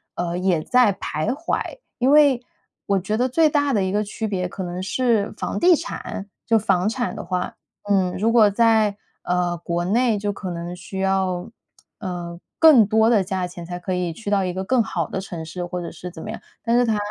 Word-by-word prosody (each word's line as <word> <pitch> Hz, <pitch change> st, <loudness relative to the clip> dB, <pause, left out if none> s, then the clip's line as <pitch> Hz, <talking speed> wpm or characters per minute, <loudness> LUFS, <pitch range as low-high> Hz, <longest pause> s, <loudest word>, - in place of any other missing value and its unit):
呃， 175 Hz, 0 st, -2 dB
也 180 Hz, -3 st, +1 dB
在 245 Hz, 0 st, +4 dB
徘 155 Hz, -2 st, -3 dB
徊。 335 Hz, -, -3 dB, 0.2 s
因 255 Hz, -, +3 dB
为 285 Hz, -5 st, +5 dB, 0.4 s
我 200 Hz, -, +2 dB
觉 210 Hz, +4 st, -2 dB
得 250 Hz, -, +2 dB
最 310 Hz, +4 st, +3 dB
大 285 Hz, -2 st, +1 dB
的 205 Hz, -, +2 dB
一 190 Hz, -, -1 dB
个 205 Hz, +2 st, +1 dB
区 220 Hz, +2 st, -5 dB
别 185 Hz, -3 st, -2 dB
可 190 Hz, +2 st, -6 dB
能 180 Hz, +1 st, -4 dB
是 225 Hz, 0 st, 0 dB
房 -, -, -3 dB
地 350 Hz, 0 st, +6 dB
产 205 Hz, -8 st, -6 dB, 0.2 s
就 230 Hz, -, +4 dB
房 195 Hz, -3 st, +1 dB
产 245 Hz, +2 st, -1 dB
的 -, -, -6 dB
话， 180 Hz, -1 st, -3 dB, 0.3 s
嗯， 190 Hz, -3 st, +2 dB
如 225 Hz, +4 st, +2 dB
果 220 Hz, -3 st, +6 dB
在， 220 Hz, -1 st, +3 dB, 0.3 s
呃， 175 Hz, -1 st, 0 dB
国 170 Hz, +1 st, -2 dB
内 230 Hz, +3 st, +2 dB
就 205 Hz, 0 st, -1 dB
可 190 Hz, -2 st, -6 dB
能 170 Hz, +1 st, -5 dB
需 190 Hz, +2 st, -7 dB
要， 190 Hz, -2 st, 0 dB, 0.5 s
呃， 175 Hz, -4 st, -5 dB, 0.2 s
更 300 Hz, -9 st, +8 dB
多 220 Hz, +1 st, +4 dB
的 225 Hz, -4 st, +4 dB
价 185 Hz, -1 st, -2 dB
钱 175 Hz, -1 st, -9 dB
才 175 Hz, +1 st, -5 dB
可 185 Hz, +1 st, -3 dB
以 180 Hz, -2 st, -1 dB
去 205 Hz, +4 st, -6 dB
到 195 Hz, -2 st, +2 dB
一 180 Hz, -, -2 dB
个 190 Hz, +1 st, -3 dB
更 245 Hz, +4 st, +2 dB
好 175 Hz, -7 st, -2 dB
的 195 Hz, -, -3 dB
城 175 Hz, -4 st, -6 dB
市， 175 Hz, +3 st, -5 dB
或 180 Hz, 0 st, -4 dB
者 170 Hz, -, -6 dB
是 180 Hz, -, -8 dB
怎 160 Hz, -, -9 dB
么 215 Hz, -, -7 dB
样。 -, -, -7 dB, 0.2 s
但 235 Hz, 0 st, +2 dB
是 245 Hz, -, +3 dB
他 220 Hz, -2 st, +1 dB
195 Hz, 235 characters per minute, -22 LUFS, 180-230 Hz, 0.5 s, 更